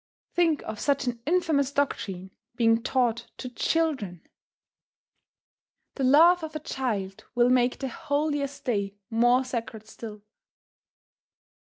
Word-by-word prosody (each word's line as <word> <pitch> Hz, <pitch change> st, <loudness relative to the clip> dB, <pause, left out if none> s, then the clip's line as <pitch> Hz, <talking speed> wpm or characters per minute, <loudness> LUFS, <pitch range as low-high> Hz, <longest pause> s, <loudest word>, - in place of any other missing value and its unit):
Think 335 Hz, -4 st, +2 dB
of 220 Hz, -1 st, -6 dB
such 280 Hz, -2 st, +1 dB
an 240 Hz, -2 st, -3 dB
infamous 310 Hz, -5 st, +2 dB
doctrine 195 Hz, -10 st, -2 dB, 0.2 s
being 225 Hz, -1 st, +3 dB
taught 240 Hz, -2 st, 0 dB
to 255 Hz, -, -6 dB
children! 250 Hz, -, -1 dB, 1.7 s
The 275 Hz, -, -3 dB
laugh 330 Hz, +7 st, +6 dB
of 315 Hz, -1 st, -7 dB
a -, -, -2 dB
child 215 Hz, -10 st, -3 dB
will 240 Hz, +1 st, +4 dB
make 250 Hz, 0 st, +3 dB
the 270 Hz, -, -3 dB
holiest 285 Hz, +1 st, -2 dB
day 200 Hz, -5 st, -1 dB, 0.2 s
more 240 Hz, +3 st, +4 dB
sacred 230 Hz, -3 st, -5 dB
still. 215 Hz, -2 st, -9 dB
250 Hz, 120 wpm, -27 LUFS, 225-285 Hz, 1.7 s, laugh